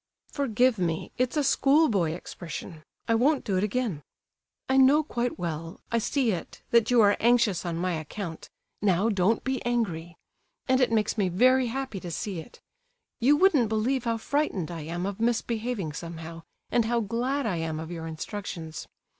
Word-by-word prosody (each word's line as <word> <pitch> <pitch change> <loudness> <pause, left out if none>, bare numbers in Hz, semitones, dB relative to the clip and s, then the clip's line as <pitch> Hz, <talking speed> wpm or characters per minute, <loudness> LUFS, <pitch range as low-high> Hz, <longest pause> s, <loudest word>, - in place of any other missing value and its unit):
"Forgive 250 -4 +2
me, 165 -3 -2
it's 255 +4 +1
a 295 - +3
schoolboy 270 - +3
expression. 170 -1 -8 0.3
I 230 - +3
won't 270 +5 +3
do 195 - 0
it 185 - +1
again. 210 - -1 0.7
I 265 - +2
know 275 +4 +6
quite 245 -4 -2
well, 165 -2 -5
I 230 - +2
see 245 +1 +1
it, 180 - -6
that 235 -2 +4
you 245 -2 +5
are 205 -1 +5
anxious 230 -6 +3
on 165 -1 -2
my 180 +1 -1
account 165 +2 -6 0.3
(now, 200 +2 +2
don't 205 +1 +2
be 265 -1 -2
angry), 175 -9 -2 0.5
and 260 0 +3
it 250 - +3
makes 220 0 +1
me 190 -3 +2
very 255 +7 +4
happy 260 -4 -4
to 180 - -7
see 180 +2 -4
it. 160 - -12 0.6
You 280 +5 +4
wouldn't 295 - +4
believe 240 +4 0
how 230 -1 0
frightened 225 - -1
I 165 -2 -5
am 175 +3 -3
of 200 +1 -4
misbehaving 230 -5 -1
somehow, 165 0 -7 0.3
and 235 -2 +3
how 235 +1 +1
glad 245 +6 -1
I 190 -6 0
am 160 -1 -3
of 160 +1 -6
your 165 -1 -5
instructions. 165 -1 -6
215 Hz, 175 wpm, -27 LUFS, 175-250 Hz, 0.7 s, know